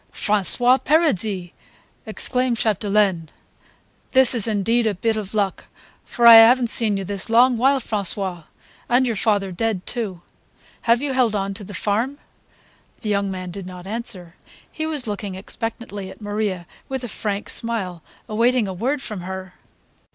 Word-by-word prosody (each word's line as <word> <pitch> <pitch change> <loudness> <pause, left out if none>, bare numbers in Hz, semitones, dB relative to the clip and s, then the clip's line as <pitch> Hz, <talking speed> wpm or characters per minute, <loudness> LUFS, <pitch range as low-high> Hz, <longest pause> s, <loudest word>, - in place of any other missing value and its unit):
"François 240 +5 +5
Paradis!" 215 - 0 0.6
exclaimed 250 +2 -1
Chapdelaine. 200 -6 0 0.8
"This 260 -1 +6
is 230 -3 +1
indeed 225 +2 +1
a 210 - -1
bit 225 +4 -1
of 215 -1 -6
luck, 200 -3 -1 0.4
for 240 - -1
I 230 -1 +11
haven't 235 +1 +6
seen 215 -4 +2
you 195 - -4
this 200 +2 -4
long 245 +2 +4
while, 265 +4 +2
François. 195 -6 -3 0.4
And 250 +2 +3
your 235 -3 -1
father 200 -2 0
dead 195 0 -2
too. 205 -8 -4 0.7
Have 235 +3 +3
you 280 -2 -2
held 245 -5 +1
on 195 0 -2
to 200 - -9
the 205 +1 -9
farm?" 225 +8 -1 0.8
The 215 - -4
young 200 -1 0
man 185 -1 -6
did 190 0 -8
not 180 -1 -10
answer; 195 -5 -2 0.4
he 315 0 -4
was 300 -5 -2
looking 205 -2 -5
expectantly 205 0 -6
at - - -13
Maria 205 -4 -3 0.2
with 265 -1 -4
a - - -4
frank 205 -2 -4
smile, 195 -7 -3 0.3
awaiting 235 +1 +1
a 190 - -5
word 260 +9 -2
from 210 -5 -6
her. 185 0 -7
215 Hz, 160 wpm, -21 LUFS, 195-240 Hz, 0.8 s, I